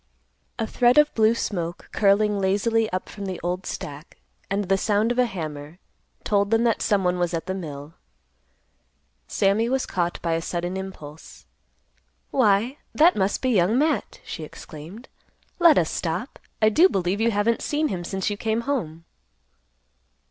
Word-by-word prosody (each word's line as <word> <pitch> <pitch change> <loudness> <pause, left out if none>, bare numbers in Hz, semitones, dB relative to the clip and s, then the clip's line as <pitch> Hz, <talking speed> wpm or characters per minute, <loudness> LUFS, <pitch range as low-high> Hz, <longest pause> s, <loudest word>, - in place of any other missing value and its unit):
A 225 - -1
thread 245 +3 +3
of 300 0 +5
blue 220 +1 +3
smoke, 175 -6 -4
curling 205 0 +3
lazily 215 +4 +1
up 185 0 -3
from 200 -1 -7
the 185 -2 -4
old 180 +2 -3
stack, 145 +3 -7 0.3
and 200 +1 0
the 195 +1 +2
sound 210 +3 +1
of 245 - -1
a 250 - +4
hammer, 155 -5 -6 0.5
told 200 -1 +1
them 225 +1 +3
that 230 -2 +1
some 200 -2 +2
one 180 0 +1
was 175 -1 0
at 165 - -4
the 190 - -3
mill. 150 -4 -7 1.3
Sammy 205 +4 +1
was 265 0 0
caught 175 -1 -2
by 165 -1 0
a 165 - 0
sudden 175 +2 -3
impulse. 160 -6 -9 0.9
"Why, 235 +2 +2 0.2
that 330 +4 +5
must 195 +3 0
be 260 - +2
Young 205 +2 +3
Matt!" 300 +2 0
she 160 - -6
exclaimed. 160 - -10 0.5
"Let 340 -3 +6
us 165 - +2
stop. 175 +8 -3 0.2
I 215 - +7
do 335 - +5
believe 190 - -1
you 230 - +3
haven't 225 +2 +1
seen 305 +1 0
him 180 -5 -3
since 190 +2 -3
you 205 - -3
came 220 +2 -1
home." 170 - -3
200 Hz, 165 wpm, -24 LUFS, 175-230 Hz, 1.3 s, I